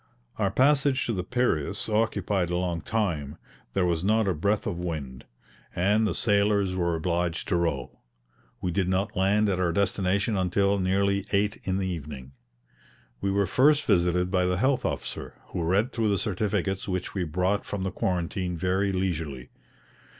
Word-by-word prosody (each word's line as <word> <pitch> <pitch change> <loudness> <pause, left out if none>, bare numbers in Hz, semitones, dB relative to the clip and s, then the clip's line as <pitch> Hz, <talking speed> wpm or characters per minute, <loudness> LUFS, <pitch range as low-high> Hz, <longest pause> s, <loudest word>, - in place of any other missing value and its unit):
Our 100 -2 +2
passage 135 +3 +3
to 115 - -1
the 90 -3 -2
Piraeus 100 - -1
occupied 105 -4 0
a 90 - 0
long 90 -2 -1
time. 85 -10 -2 0.4
There 95 -2 +2
was 85 -1 0
not 110 +1 +2
a 95 - +2
breath 100 +6 0
of 90 -5 -3
wind, 75 -7 -5 0.5
and 105 +5 +2
the - - -1
sailors 100 -3 +2
were 85 -2 0
obliged 85 +1 -1
to 90 - +2
row; 80 -7 -2 0.6
we 90 - -1
did 95 0 0
not 95 +1 0
land 100 +3 +3
at 95 -2 0
our 90 -2 +2
destination 100 +3 +1
until 100 +2 +1
nearly 100 +1 +1
8 100 +1 +1
in 95 0 0
the 95 - -1
evening. 70 -7 -6 0.9
We 100 - 0
were 100 +1 +2
first 145 - +3
visited 90 -2 +2
by 90 -2 +2
the 90 0 0
health 130 +3 +1
officer, - - -4
who - - -3
read 95 +8 +1
through 115 -3 0
the 100 - +2
certificates 95 0 -1
which 90 -2 -3
we 95 - -1
brought 90 +5 0
from 100 -2 -4
the 95 - -2
quarantine 90 -1 -2
very 95 +3 +1
leisurely. 80 -9 -3
95 Hz, 170 wpm, -27 LUFS, 85-100 Hz, 0.9 s, passage